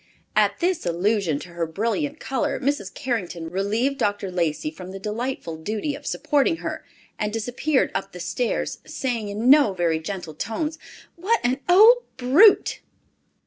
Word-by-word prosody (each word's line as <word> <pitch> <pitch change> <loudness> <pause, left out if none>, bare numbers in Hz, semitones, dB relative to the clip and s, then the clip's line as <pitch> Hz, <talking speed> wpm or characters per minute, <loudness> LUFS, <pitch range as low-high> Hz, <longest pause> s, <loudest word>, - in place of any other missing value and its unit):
At - - +2
this 355 0 +1
allusion 180 -1 +1
to 180 - -10
her 170 -1 -3
brilliant 235 - -2
color, 265 -2 -2
Mrs. 255 -8 -1
Carrington 180 - -4
relieved 220 +9 0
Dr. 205 -2 -1
Lacey 160 -4 -1
from 180 +3 -10
the 195 - -7
delightful 210 -4 -4
duty 215 - -3
of - - -9
supporting 295 +2 +1
her, - - -5 0.4
and 210 0 -1
disappeared 245 +6 0
up 195 - -3
the 180 - -10
stairs, 175 +8 -2
saying 235 -5 -3
in 215 +4 -2
no 275 -6 +6
very 170 -3 0
gentle 175 -1 -6
tones, 300 - -3 0.4
"What 425 +7 +1
an 255 +3 +1
old 435 +7 +8 0.2
brute!" 285 - +5
215 Hz, 150 wpm, -23 LUFS, 180-275 Hz, 0.4 s, old